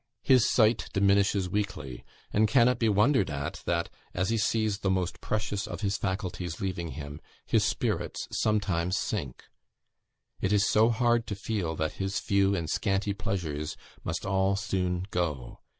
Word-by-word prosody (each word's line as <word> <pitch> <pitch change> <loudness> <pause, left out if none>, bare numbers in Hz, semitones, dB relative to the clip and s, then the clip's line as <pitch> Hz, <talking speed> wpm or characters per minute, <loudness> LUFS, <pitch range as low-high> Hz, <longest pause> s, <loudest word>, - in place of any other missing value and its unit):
His 130 -3 +5
sight 110 -1 +3
diminishes 100 -1 +3
weekly; 80 -10 -3 0.3
and 110 +1 +4
can 120 +2 +5
it 125 -1 +1
be 115 - +3
wondered 105 - +3
at 70 -1 -4
that, - - +1 0.3
as 95 +1 0
he 115 - +2
sees 110 -2 +1
the 100 - 0
most 95 -2 -1
precious 105 -2 -2
of - - -6
his 100 -1 0
faculties 90 -4 -3
leaving 85 -5 -3
him, 75 +1 -7 0.2
his - - +2
spirits - - -1
sometimes 95 -4 +1
sink? 85 - -3 1.0
It 95 - 0
is 100 -1 +3
so 110 +2 +4
hard 120 0 +2
to 100 - -3
feel 95 -5 -2
that 80 0 -2
his 95 +2 -1
few 100 0 +2
and 85 -4 -2
scanty 100 +3 0
pleasures 80 -7 -3 0.3
must - - -3
all 95 0 +2
soon 95 -2 -1
go. 75 - -2
100 Hz, 160 wpm, -28 LUFS, 90-105 Hz, 1.0 s, His